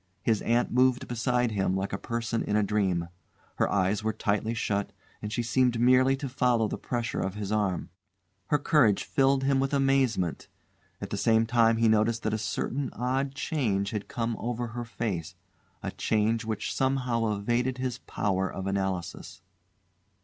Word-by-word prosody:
His 110 -3 +2
aunt 120 +1 +1
moved 125 0 +3
beside 125 0 0
him 95 -2 0
like 95 +1 -3
a - - 0
person 115 -1 -2
in 105 - -1
a 105 - +3
dream. 95 -5 0 0.5
Her - - +1
eyes 100 +2 +1
were 110 - +1
tightly 110 +3 -1
shut, 100 -3 -1 0.3
and 105 - -5
she 120 +1 -1
seemed 120 +1 +2
merely 130 +2 +5
to 140 - -4
follow 125 -3 +2
the - - -5
pressure 120 -1 -2
of 95 +1 -2
his 105 -1 -4
arm. 100 -5 -1 0.6
Her 150 - +3
courage 140 -8 +3
filled 135 0 +2
him 135 0 +2
with 135 +1 0
amazement. 135 - +1 0.5
At - - -6
the - - -2
same 115 0 +3
time 115 -1 +3
he 115 0 +3
noticed 110 +1 +2
that 110 - 0
a 110 - 0
certain 135 +5 -2
odd 135 +2 -1
change 105 -11 -1
had 105 -2 -4
come 115 -1 -2
over 120 0 -3
her 120 +1 -5
face, 90 -8 -4 0.5
a - - -3
change 110 +1 0
which 110 -2 -3
somehow 125 -4 0
evaded 120 +5 0
his 130 -1 -3
power 95 -2 -1
of 95 - -5
analysis. 95 -3 -3
115 Hz, 170 wpm, -28 LUFS, 105-125 Hz, 0.6 s, merely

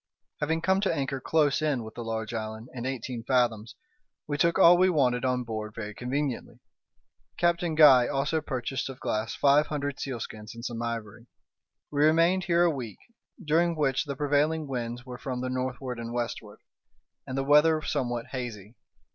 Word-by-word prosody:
Having 160 +2 0
come 190 +3 +2
to 200 - +1
anchor 135 -1 -2
close 150 -1 +2
in 145 -6 0
with 110 - -9
the 120 - -6
large 110 0 -4
island, 110 +1 -5
in 125 0 -4
eighteen 125 -2 -4
fathoms, 120 -3 0 0.5
we 145 - -3
took 170 +3 +2
all 170 +1 +8
we 185 +1 +4
wanted 130 -7 +2
on 125 -1 0
board 110 -2 -5
very 105 -2 -6
conveniently. 130 +2 -3 0.8
Captain 170 -1 +1
Guy 135 -6 +7
also 145 +3 0
purchased 135 -2 -3
of 130 - -9
Glass 110 +2 -2
five 145 +2 +4
hundred 145 -2 -3
sealskins 115 -4 -6
and 115 +1 -8
some 120 -2 -4
ivory. 115 0 -5 0.6
We 145 0 +2
remained 165 +4 +4
here 170 -1 +3
a 175 - +4
week, 115 -6 -6 0.5
during 165 +2 +2
which 135 -4 +1
the 140 -1 -4
prevailing 150 +2 +1
winds 120 -2 -4
were 125 -1 -8
from 125 -2 -4
the 130 - -2
northward 130 -1 -3
and 115 0 -5
westward, 120 -2 -5 0.7
and 130 - -4
the 135 - 0
weather 150 +3 +5
somewhat 120 -4 -2
hazy. 115 -5 -6
130 Hz, 170 wpm, -28 LUFS, 120-150 Hz, 0.8 s, all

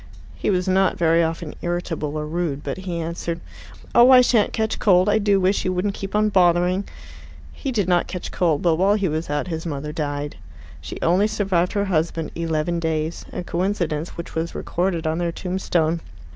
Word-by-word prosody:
He - - -2
was 185 -1 +1
not 190 0 +2
very 165 0 +3
often 165 -1 -2
irritable 165 -3 -3
or 150 - -3
rude, 155 -3 -2
but - - -4
he 185 -2 -4
answered, 170 0 -3 0.5
"Oh, 240 +2 +7
I 255 -1 +9
shan't 235 -4 +3
catch 220 0 -1
cold. 185 -2 +4
I 210 +1 +3
do 200 -2 +3
wish 190 +2 +1
you 185 - 0
wouldn't 185 +3 -1
keep 195 +1 -6
on 215 0 +3
bothering." 180 0 +3 0.7
He 275 - -4
did 205 -7 0
not 175 -1 +2
catch 180 - -6
cold, 165 -5 +1
but 165 -2 +3
while 195 +4 +3
he 200 -3 0
was 155 0 -3
out 145 +4 -1
his 160 -1 -3
mother 150 -2 -4
died. 145 -2 -3 0.4
She - - -7
only 185 +5 +3
survived 190 -5 0
her 200 -1 +1
husband 165 -3 -1
eleven 165 0 -1
days, 160 0 -2
a - - -4
coincidence 175 -4 -2
which 170 - -7
was 165 +1 -3
recorded 175 -2 -1
on 160 +1 0
their 170 -1 0
tombstone. 170 -3 -1
175 Hz, 190 wpm, -22 LUFS, 160-190 Hz, 0.7 s, I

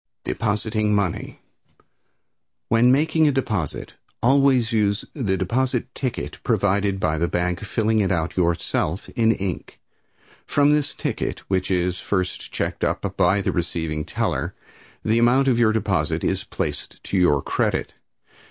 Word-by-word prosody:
Depositing 105 0 0
Money. 100 -4 -2 1.3
When 120 +2 +5
making 155 +3 +3
a - - +4
deposit, 105 - -2 0.3
always 130 -2 +4
use 105 -1 +1
the 100 -10 -1
deposit 125 +6 -1
ticket 130 -3 -4
provided 100 -2 +1
by 80 -4 0
the 85 - +1
bank, 90 +2 -1
filling 110 +1 0
it 100 -2 +1
out 85 -2 -1
yourself 85 0 0
in 115 -2 +2
ink. 95 -5 -4 0.7
From 145 0 +3
this 150 -1 +1
ticket, - - -3
which 95 -1 0
is 90 -1 0
first 95 -2 -2
checked - - -3
up - - -1
by 95 +3 +3
the - - 0
receiving 80 -3 -2
teller, - - -2 0.5
the 110 +2 +3
amount 125 +3 +4
of 120 -3 +3
your 115 -2 +4
deposit 110 -2 0
is - - -1
placed - - -5
to - - -4
your 80 -7 +3
credit. - - -1
105 Hz, 140 wpm, -23 LUFS, 90-120 Hz, 1.3 s, When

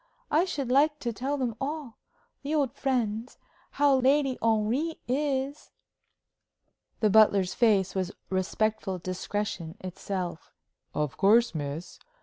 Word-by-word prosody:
"I 320 +5 +4
should 275 -9 -3
like 295 +3 +4
to 235 -2 -2
tell 270 +6 -2
them 250 -4 -1
all 285 -4 -4 0.4
the 290 +3 -2
old 280 -5 +1
friends 240 -3 -1 0.4
how 280 -1 +4
Lady 270 0 +3
Henry 230 +9 +1
is." 275 +1 -1 1.3
The 215 -2 +4
butler's 200 -3 +5
face 205 -6 +3
was 190 -1 -2 0.2
respectful 190 +1 -1
discretion 185 -1 -4
itself. 180 -2 -5 0.4
"Of 150 -3 -2
course, 220 +4 +4
miss. 150 +2 -5
230 Hz, 120 wpm, -28 LUFS, 190-275 Hz, 1.3 s, butler's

